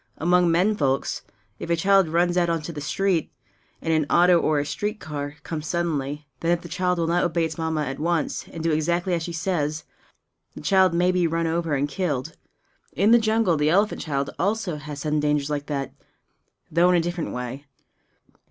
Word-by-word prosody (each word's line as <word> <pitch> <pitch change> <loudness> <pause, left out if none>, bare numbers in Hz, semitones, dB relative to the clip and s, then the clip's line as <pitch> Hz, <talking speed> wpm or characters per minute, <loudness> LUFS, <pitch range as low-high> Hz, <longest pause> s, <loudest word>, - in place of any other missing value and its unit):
Among 175 +1 +3
men 180 +6 +3
folks, 135 -7 0 0.4
if - - -6
a 170 - +3
child 195 +2 +4
runs 175 +2 +2
out 175 -1 +2
into 165 0 -2
the 145 - -6
street, 170 +3 0 0.5
and 165 - +1
an 155 -2 +1
auto 175 0 +5
or 155 -2 +1
a 145 - 0
street 210 +7 -3
car 145 -1 -5
comes 155 -2 -5
suddenly, 150 -4 -2
then 165 - -1
if 175 0 +2
the 175 - -9
child 180 +2 0
will 165 - 0
not 170 +2 +1
obey 170 -1 +1
its 160 -1 -4
Mamma 160 -1 -1
at 135 0 -5
once 165 0 -1
and 165 - -7
do 165 - +1
exactly 170 +4 0
as 170 - 0
she 170 - -4
says, 160 -3 -2 0.7
the - - -8
child 190 -3 +3
may 180 +1 +3
be 180 -2 +2
run 165 +1 -1
over 165 -2 0
and 140 +1 0
killed. 145 -6 -3 0.6
In 200 +9 +3
the 235 - +7
jungle 220 -6 +2
the 150 +1 +2
elephant 200 +5 +2
child 140 -3 -2
also 195 -3 -1
has 145 -1 -7
sudden 150 0 0
dangers 150 -1 0
like 145 -1 -3
that, 140 -2 -3 0.8
though 170 +3 +4
in 180 - +4
a - - +4
different 175 0 -3
way. 125 +3 -6
165 Hz, 200 wpm, -24 LUFS, 150-180 Hz, 0.8 s, the